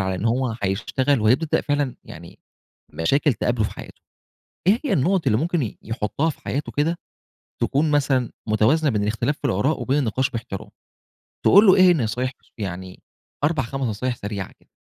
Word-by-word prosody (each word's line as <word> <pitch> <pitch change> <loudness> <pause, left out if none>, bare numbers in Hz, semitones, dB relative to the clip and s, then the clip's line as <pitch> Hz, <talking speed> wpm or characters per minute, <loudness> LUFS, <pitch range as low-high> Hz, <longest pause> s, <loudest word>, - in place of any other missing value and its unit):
على 95 0 -1
إن 95 - -4
هو 120 0 +1
حيشتغل 115 +6 0
وهيبدأ 130 +9 +2
فعلًا 145 -3 -1
يعني 85 +1 -12 0.6
مشاكل 140 - +2
تقابله 120 0 0
في - - -2
حياته، - - -11 0.7
إيه 215 +5 +5
هي - - +1
النقط 180 +6 +1
اللي 105 - +3
ممكن 170 +2 0
ي 110 - -5
يحطها 115 +8 -2
في - - -7
حياته 140 +2 -3
كده، 165 +4 0 0.7
تكون 150 +3 +1
مثلًا 135 -4 +1 0.2
متوازنة 130 +9 +3
بين 105 -4 0
الاختلاف 115 +8 -1
في - - -26
الآراء 130 +7 0
وبين 140 +3 +1
النقاش 130 +1 0
بإحترام؟ 110 -5 -6 0.8
تقول 200 +3 +7
له 190 - +8
إيه 185 -1 +7
النصايح 125 -4 0 0.3
يعني 95 -2 -6 0.4
4 150 -2 +2
5 135 +4 -5
نصايح 120 +2 -2
سريعة 100 -3 -5
كده؟ - - -30
130 Hz, 165 wpm, -23 LUFS, 110-145 Hz, 0.8 s, له